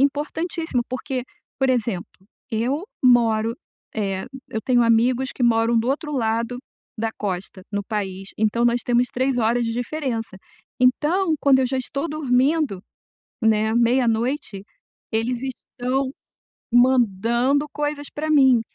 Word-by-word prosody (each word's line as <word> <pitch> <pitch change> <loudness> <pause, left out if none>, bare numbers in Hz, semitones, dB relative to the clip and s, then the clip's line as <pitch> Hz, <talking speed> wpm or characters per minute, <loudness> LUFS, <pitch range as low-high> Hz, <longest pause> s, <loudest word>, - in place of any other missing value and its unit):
importantíssimo 300 0 0
porque, 255 0 -3 0.4
por 265 - +2
exemplo, 230 -7 -1 0.4
eu 250 - -1 0.2
moro, 230 -3 +4 0.4
eh 195 -3 -2 0.2
eu 220 - -3
tenho 245 -2 +3
amigos 240 +3 +3
que - - -4
moram 230 0 +3
do 230 +2 0
outro 300 +2 -2
lado 230 -1 -1 0.4
da 225 +1 -1
costa, 190 -1 -4
no 205 0 -1
país, 195 -3 -4
então, 220 +2 +2
nós 240 0 +3
temos 245 0 +2
3 260 +1 0
horas 235 +1 +2
de 230 - -1
diferença, 245 -4 -3 0.4
então, 310 +8 +3
quando 275 -2 +5
eu 260 - +2
já 265 +2 -2
estou 275 +5 -3
dormindo, 280 - +1 0.6
né, 220 -1 +2
meia-noite, 235 -2 +1 0.5
eles 230 +2 0
estão 260 0 -3 0.6
mandando 245 +3 +3
coisas 295 -1 -3
pra 310 +1 -3
mim, 265 -5 +5
245 Hz, 130 wpm, -22 LUFS, 225-270 Hz, 0.6 s, quando